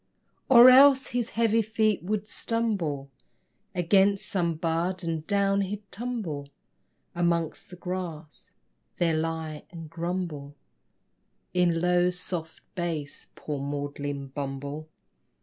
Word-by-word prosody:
Or 245 -1 +10
else 270 +1 +7
his 240 -1 -1
heavy 230 -1 +3
feet 215 -1 +1
would 210 +3 -2
stumble 190 -14 -2 0.6
Against 195 +3 +3
some 170 -4 0
bud 170 +3 -1
and 160 -2 -3
down 200 -1 +2
he'd 200 +2 -4
tumble 200 -12 -4 0.6
Amongst 170 -2 -1
the 180 - -9
grass; 175 -4 -6 0.5
there 170 -2 +2
lie 160 -1 -3
and 165 -3 -10
grumble 165 -4 -4 1.0
In 175 -2 +2
low, 180 0 +3
soft 175 -2 -5
bass 160 -5 -4
poor 150 -2 -5
maudlin 140 0 -4
bumble! 140 +2 -5
175 Hz, 110 wpm, -27 LUFS, 155-200 Hz, 1.0 s, Or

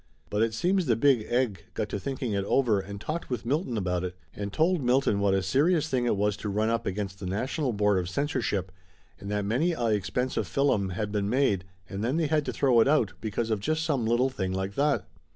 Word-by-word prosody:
But 105 - +1
it 115 -1 +1
seems 180 +4 +1
the 115 - +4
Big 120 -2 +3
Egg 120 -6 0
got 105 - -1
to 100 - -3
thinking 130 0 -3
it 100 -1 0
over 115 -3 +2
and 100 +1 -7
talked 155 +10 -4
with 120 -3 -3
Milton 135 -2 -1
about 90 -3 -1
it, 90 -1 -4 0.2
and 100 -1 -5
told 165 - +2
Milton 125 -4 +2
what 100 -1 +2
a 95 - +1
serious 150 - +2
thing 125 -3 +1
it 110 - +1
was 105 0 +1
to 105 - -4
run 105 +2 +1
'up 115 0 -1
against 95 0 -3
the 95 - -5
National 125 - -1
Board 105 -2 +2
of 90 -1 -3
Censorship 105 -5 -1 0.5
and 100 - -7
that 105 -1 -1
many 135 - +1
a 120 -7 0
expensive 105 +5 -1
fillum 125 -9 +1
had 105 +3 -3
been 100 -1 -1
made 105 -7 +2 0.2
and 100 +3 -5
then 130 +7 0
they 165 - +2
had 150 -1 +1
to - - -2
throw 130 -4 +3
it - - +3
out 140 -8 +2
be 110 - -3
cause 115 +2 -2
of 110 - +1
just 155 +8 -1
some 140 -8 0
little 125 +3 +2
thing 95 -7 -2
like 95 +1 -2
that. 140 -5 +1
115 Hz, 240 wpm, -27 LUFS, 100-135 Hz, 0.5 s, the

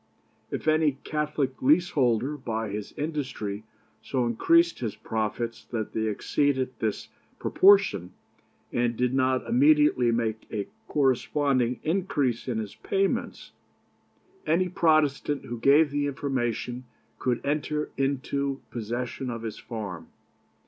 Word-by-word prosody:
If - - -5
any 155 -2 +4
Catholic 150 -3 -2
leaseholder 140 -4 +3
by 115 -5 -3
his 105 0 -5
industry 130 -9 -4 0.4
so 130 -3 -1
increased 165 +9 +3
his 115 -5 -3
profits 110 +1 -3
that 110 -3 -4
they 110 0 0
exceeded 130 +4 0
this 110 -2 -2 0.3
proportion, 190 - +4 0.6
and 120 -1 0
did 125 0 +1
not 130 -1 +1
immediately 290 - +4
make 110 -1 -1
a 105 -3 -3 0.2
corresponding 130 -2 +1
increase 150 - 0
in 120 -3 -1
his 110 -2 -4
payments, 195 0 -2 1.0
any 180 +3 +2
Protestant 155 -5 +2
who 120 -1 -5
gave 145 +4 +5
the 145 0 0
information 130 -3 -2 0.3
could 125 -2 0
enter 150 +1 -1
into 140 0 -1
possession 120 +3 -4
of 115 -1 -5
his 110 -2 -5
farm. 100 -8 -6
130 Hz, 115 wpm, -27 LUFS, 115-150 Hz, 1.0 s, gave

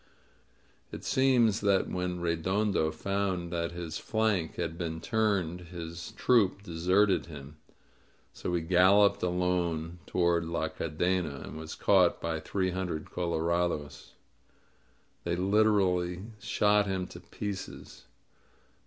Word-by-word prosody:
It - - -8
seems 120 -5 +3
that 100 -2 +2
when 90 -1 -3
Redondo 85 +1 +1
found 95 -1 -2
that 85 0 -1
his 85 -2 -5
flank 110 -7 0
had 80 - -3
been 80 -2 -4
turned 100 -6 0
his 85 -1 -7
troop 100 -5 +2
deserted 95 +3 +2
him; 75 -1 -10 0.8
so - - -4
he 85 - 0
galloped 95 +4 +4
alone 90 -2 -1
toward 85 -1 +2
La 80 -1 -2
Cadena, 80 -1 -1
and - - -9
was 80 0 -7
caught 95 -3 +3
by 80 -1 -2
three 95 +3 -1
hun 95 0 -2
dred 80 -3 -5
colorados. 85 -3 -2 1.1
They 85 0 -1
literally 95 -2 +2 0.2
shot 105 0 +2
him 95 -1 -1
to - - -11
pieces. 100 -2 -7
90 Hz, 120 wpm, -30 LUFS, 85-100 Hz, 1.1 s, galloped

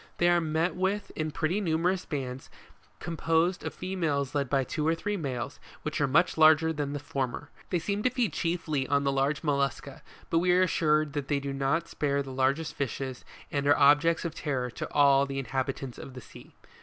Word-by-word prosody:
They 175 - +3
are 175 0 +4
met 160 +2 0
with 190 +3 -1
in 155 0 -2
pretty 165 +6 -1
numerous 180 +1 0
bands 130 -3 -5 0.5
composed 165 +2 0
of - - -3
females 155 -8 -2
led 140 -3 -1
by 135 0 +2
two 150 +3 -2
or 165 - +3
three 205 +5 -3
males, 135 -6 -4 0.2
which 150 -1 -2
are 140 - +3
much 160 +4 +2
larger 160 +1 +6
than 145 -2 -3
the 145 - -3
former. 140 0 -4 0.2
They 180 - +1
seem 200 +4 -2
to 255 - +3
feed 250 -4 -1
chiefly 160 -6 -1
on 140 0 +2
the 140 - +1
large 135 +2 0
mollusca; 140 -3 -1 0.3
but 165 - +4
we 180 +1 +3
are 185 +1 +5
assured 155 -4 +2
that 145 -2 -3
they 145 -1 +1
do 140 0 -4
not 140 +5 0
spare 140 -1 -1
the 135 - -8
largest 140 +4 0
fishes, 130 -1 -4 0.3
and 140 -1 -1
are 145 - +5
objects 150 +4 +4
of 165 - -3
terror 130 -6 -2
to - - -6
all 140 -1 +4
the 135 0 -5
in 135 - -3
habitants 130 0 -3
of 130 - -10
the 125 - -8
sea. - - -15
150 Hz, 205 wpm, -28 LUFS, 140-165 Hz, 0.5 s, larger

